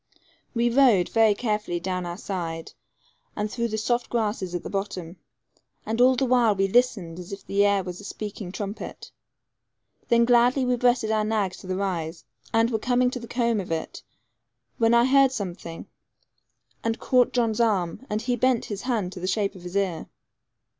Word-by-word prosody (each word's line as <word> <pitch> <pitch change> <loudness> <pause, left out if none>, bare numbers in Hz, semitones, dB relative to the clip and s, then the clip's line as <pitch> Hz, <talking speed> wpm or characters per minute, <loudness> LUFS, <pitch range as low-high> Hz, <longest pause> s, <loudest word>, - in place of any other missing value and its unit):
We 235 +1 +2
rode 235 -9 +4
very 225 -2 +4
carefully 210 -6 -2
down 180 0 -3
our 175 0 -5
side, 165 -5 -5 0.6
and 210 0 -2
through 235 -1 -1
the 220 -1 -3
soft 240 +3 0
grass 220 -3 -1
at 175 -2 -4
the - - -5
bottom, 190 -3 -4 0.7
and 225 +2 -1
all 255 +1 +6
the 265 - +1
while 240 -4 +3
we 195 0 +2
listened 195 -7 +1
as 180 +1 -9
if 200 - -8
the 200 +1 +2
air 200 -1 +3
was 180 +1 -7
a - - -13
speaking 205 -2 -6
trumpet. 200 +2 -6 1.0
Then 235 0 +4
gladly 245 +2 +4
we 250 0 +2
breasted 240 -2 +2
our 215 -1 +2
nags 210 -4 -1
to - - -12
the 185 - -2
rise, 170 -7 -3 0.3
and 225 +1 +3
were 220 - 0
coming 250 +2 +2
to 255 - -4
the 235 - -9
comb 235 -3 0
of 180 -3 -5
it, 160 -1 -4 0.8
when 230 +1 +4
I 235 0 +5
heard 270 0 +5
something, 180 -7 -6 1.0
and 225 0 0
caught 250 -2 +3
John's 230 -3 0
arm, 195 -3 0
and 215 +1 -2
he 245 0 0
bent 255 0 +2
his 200 - -5
hand 220 -8 -1
to 185 - -8
the 185 - -3
shape 200 +1 0
of 185 - -12
his 180 +1 -8
ear. 190 -5 -1
215 Hz, 190 wpm, -25 LUFS, 185-240 Hz, 1.0 s, all